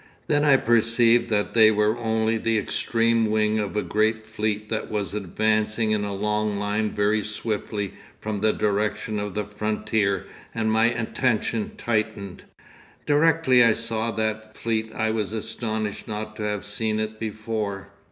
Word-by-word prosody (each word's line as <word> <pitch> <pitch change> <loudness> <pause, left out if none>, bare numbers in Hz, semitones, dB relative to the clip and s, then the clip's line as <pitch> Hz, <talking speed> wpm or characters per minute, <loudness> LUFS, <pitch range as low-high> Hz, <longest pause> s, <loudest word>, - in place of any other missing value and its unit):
Then 145 -1 +2
I 140 -2 +6
perceived 115 0 +3
that 105 -2 0
they 110 -2 +7
were 105 0 +2
only 110 -1 0
the 115 0 +1
extreme 115 +2 +1
wing 110 0 +2
of 105 -1 -3
a 105 - 0
great 110 +1 0
fleet 110 -1 -2
that 110 -1 -3
was 100 -4 -2
advancing 110 +2 0
in 105 -1 +1
a 100 - -3
long 105 +1 0
line 105 +1 0
very 105 +1 +1
swiftly 105 -2 -3 0.3
from 105 -1 -3
the 110 0 +4
direction 105 +1 -1
of 105 -2 -4
the 105 -1 -1
frontier 105 -1 -1 0.3
and 110 -1 0
my 110 +1 +4
attention 115 -1 0
tightened. 110 -4 -2 0.6
'Directly 150 -4 +4
I 115 -2 +5
saw 115 0 -2
that 110 -1 -3
fleet 110 -1 -1
I 110 0 -1
was 110 -1 -2
astonished 110 -1 -4
not 110 0 -5
to 110 - -4
have 105 -1 -2
seen 110 +1 -2
it 110 0 -3
before. 110 -3 -4
110 Hz, 155 wpm, -24 LUFS, 105-115 Hz, 0.6 s, they